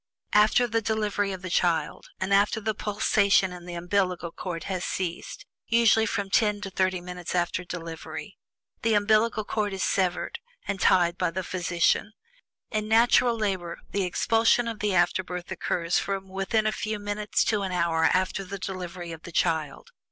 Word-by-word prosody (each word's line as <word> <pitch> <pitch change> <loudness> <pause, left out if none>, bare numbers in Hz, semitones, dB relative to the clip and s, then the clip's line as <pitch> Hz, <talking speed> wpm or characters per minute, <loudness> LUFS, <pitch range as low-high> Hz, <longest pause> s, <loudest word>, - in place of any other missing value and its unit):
After 215 +4 +5
the 225 -1 0
delivery 210 -2 -1
of 190 -1 -7
the 185 - -4
child, 165 -4 0
and 190 +1 0
after 205 +2 +3
the 220 0 -1
pulsation 200 -2 +2
in 180 0 -10
the 175 - -6
umbillical 180 -1 -1
cord 170 -3 -5
has 185 -2 -3
ceased 175 -2 -4 0.2
(usually 225 -1 +4
from 200 -2 -2
ten 210 -1 +3
to 195 - -5
thirty 185 0 +1
minutes 180 0 -6
after 175 +1 0
delivery), 165 -2 -7 0.5
the 225 -1 +2
umbillical 215 +1 +2
cord 210 -2 -1
is 190 - -2
severed 180 -2 0 0.3
and 195 - -2
tied 175 -3 +3
by 180 - +2
the 185 +3 -4
physician. 175 +3 0 0.6
In 215 -2 -1
natural 235 +1 +4
labor, 190 -5 -2
the 200 - 0
expulsion 225 +5 +2
of 225 -2 -4
the 205 -2 0
afterbirth 180 +1 0
occurs 175 -1 0
from 195 -1 -4
within 195 +3 0
a 215 - +2
few 215 0 -3
minutes 205 +1 -1
to 210 -2 +1
an 190 -1 -2
hour 170 -2 +1
after 185 +3 +1
the 195 +1 -6
delivery 180 -2 -6
of 160 -1 -8
the 170 - -10
child. 160 -4 -1
190 Hz, 170 wpm, -26 LUFS, 175-210 Hz, 0.6 s, After